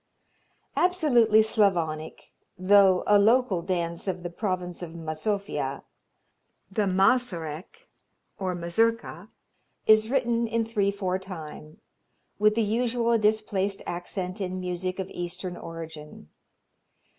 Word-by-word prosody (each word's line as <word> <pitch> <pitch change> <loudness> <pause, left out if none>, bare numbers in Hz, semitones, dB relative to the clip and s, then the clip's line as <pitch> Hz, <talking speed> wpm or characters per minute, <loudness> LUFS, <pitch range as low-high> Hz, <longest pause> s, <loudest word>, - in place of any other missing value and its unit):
Absolutely 245 -12 +4
Slavonic, 175 -8 0 0.3
though 190 0 +5
a 205 0 +5
local 220 -3 +3
dance 170 0 -3
of 180 -2 -3
the 175 - -5
province 180 -2 -3
of 170 -2 -7
Mazovia, 160 -2 -3 0.9
the 205 +1 0
Mazurek 190 - 0 0.5
or 185 -2 -2
Mazurka, 225 +7 -1 0.6
is 215 0 +5
written 240 -3 +1
in 230 0 0
three 210 -3 0
four 190 -2 -2
time, 160 -4 -10 0.6
with 215 0 +4
the 230 - +2
usual 235 +1 +1
displaced 210 -2 0
accent 180 +2 -4
in 185 -1 -3
music 180 0 -3
of 190 -1 -3
Eastern 175 +1 -5
origin. 160 - -9
190 Hz, 110 wpm, -26 LUFS, 175-220 Hz, 0.9 s, though